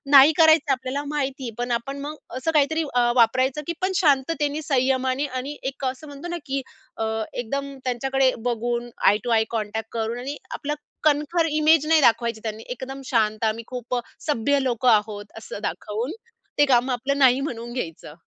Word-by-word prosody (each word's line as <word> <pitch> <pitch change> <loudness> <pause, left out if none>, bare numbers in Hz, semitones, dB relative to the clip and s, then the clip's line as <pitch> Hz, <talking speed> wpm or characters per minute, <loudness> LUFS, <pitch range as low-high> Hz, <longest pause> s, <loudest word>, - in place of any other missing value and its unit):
नाही 275 +3 +9
करायचं 315 -3 +5
आपल्याला 260 +2 -2
माहिती 275 -2 -2
आहे 235 - -4
पण 245 0 -2
आपण 245 +4 -2
मग 295 +2 -5 0.2
असं 325 +5 -1
काहीतरी 315 +1 +2
अ, 240 -1 +3
वापरायचं 260 +4 -1
की 340 - -1
पण 375 - +1
शांततेने, 295 -1 +2
संयमाने 260 -1 +1
आणि 275 +4 -4
एक 275 0 -4
असं 260 +4 -4
म्हणतो 285 +3 -8
ना 345 0 -3
की 275 -1 -2 0.4
अ, - - -1 0.3
एकदम 275 +3 -4
त्यांच्याकडे 265 +1 +1
बघून 240 0 -1 0.2
आई 205 - +6
टू 245 - -3
आई 220 -1 +4
कॉन्टॅक्ट 220 -1 -3
करून 225 +1 -2
आणि 275 +4 -5
आपला 295 +1 -3 0.3
कणखर 305 +3 +2
इमेज 310 0 +4
नाही 320 -1 +5
दाखवायची 235 -2 +3
त्यांनी 220 0 -5
एकदम 260 +2 -6
शांत 215 -3 +1
आम्ही 220 +1 -1
खूप 250 0 -4 0.3
सभ्य 285 0 +2
लोकं 250 -1 +2
आहोत, 210 -2 +2
असं 220 - -7
दाखवून 220 +8 -3 0.5
ते 290 - +6
काम 255 -1 +3
आपलं 265 +3 -1
नाही 260 -2 +5
म्हणून 240 -4 -5
घ्यायचं. 165 -10 -5
260 Hz, 175 wpm, -24 LUFS, 235-285 Hz, 0.5 s, नाही